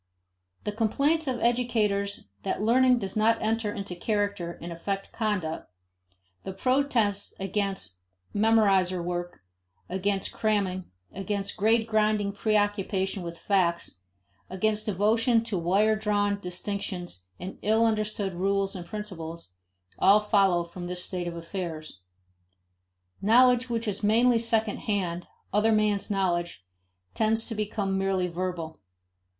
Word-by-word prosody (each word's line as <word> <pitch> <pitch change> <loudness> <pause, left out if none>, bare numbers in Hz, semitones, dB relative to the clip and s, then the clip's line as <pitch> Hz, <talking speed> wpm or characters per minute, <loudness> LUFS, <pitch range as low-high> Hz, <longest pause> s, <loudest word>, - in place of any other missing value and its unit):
The 210 - -2
complaints 280 +9 +1
of 255 -2 -1
educators 210 - 0
that - - -2
learning 250 +3 +5
does 195 -5 -4
not 225 +1 +3
enter 220 -1 0
into 200 -3 -5
character 200 -3 -2
and 170 - -7
affect 195 +4 -4
conduct; 185 - -2 0.7
the 190 - -6
protests 230 -3 +1
against 195 - -2 0.3
memoriter 200 -5 +3
work, 175 - -4 0.5
against 195 +1 -1
cramming, 195 -4 0 0.3
against 195 +1 -3
gradgrind 215 -1 +2
preoccupation 205 -2 0
with 170 -1 -6
"facts," 170 - 0 0.5
against 210 +3 0
devotion 225 +4 +3
to 220 -5 -2
wire 200 +6 +3
drawn 205 -1 0
distinctions 180 - -5
and 185 - -7
ill 220 +2 +3
understood 215 -3 -1
rules 195 +2 0
and 175 -2 -7
principles, 170 - -7 0.5
all 200 +2 +6
follow 195 -4 +3
from 175 +1 -8
this 180 0 -2
state 180 -2 -3
of 170 - -4
affairs. 165 - -6 1.2
Knowledge 250 +3 +5
which 230 -1 -2
is 205 - -2
mainly 230 +3 +4
second 225 -2 +1
hand, 180 -5 -2 0.3
other 210 +2 +3
men's 210 -2 +1
knowledge, 175 - -1 0.5
tends 220 +1 +1
to - - -2
become 205 -2 -1
merely 190 -1 +1
verbal. 170 -2 -4
200 Hz, 120 wpm, -27 LUFS, 180-220 Hz, 1.2 s, all